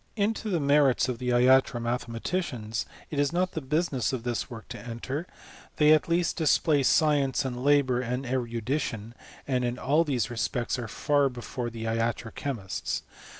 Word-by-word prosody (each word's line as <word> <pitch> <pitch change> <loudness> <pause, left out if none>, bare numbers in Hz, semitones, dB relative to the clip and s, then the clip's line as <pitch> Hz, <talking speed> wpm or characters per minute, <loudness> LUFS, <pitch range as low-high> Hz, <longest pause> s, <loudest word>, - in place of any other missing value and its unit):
Into 215 +1 -1
the 175 -4 +1
merits 140 -3 +3
of 125 -3 -3
the 125 -1 -2
iatro 125 0 +4
mathematicians 120 0 -3 0.2
it 145 - -2
is 145 +1 +2
not 180 +2 0
the 160 - -4
business 140 -2 0
of 130 -3 -3
this 120 +1 -2
work 115 -3 -9
to 125 - -7
enter; 130 +7 -5 0.5
they 150 0 +5
at 155 +2 +2
least 170 0 +1
dis 145 -7 +4
play 145 0 +2
science, 140 -1 +3
and 125 -1 -4
labour, 140 -3 +3
and 125 +2 -3
erudition, 120 -2 -2 0.3
and 130 -2 0
in 120 0 -1
all 150 +6 +2
these 125 - -1
respects 120 +2 -1
are 120 - -4
far 145 +5 +1
before 120 -1 -5
the 115 -1 -7
iatro 115 0 -1
chemists. 115 -10 -3
130 Hz, 170 wpm, -27 LUFS, 120-145 Hz, 0.5 s, they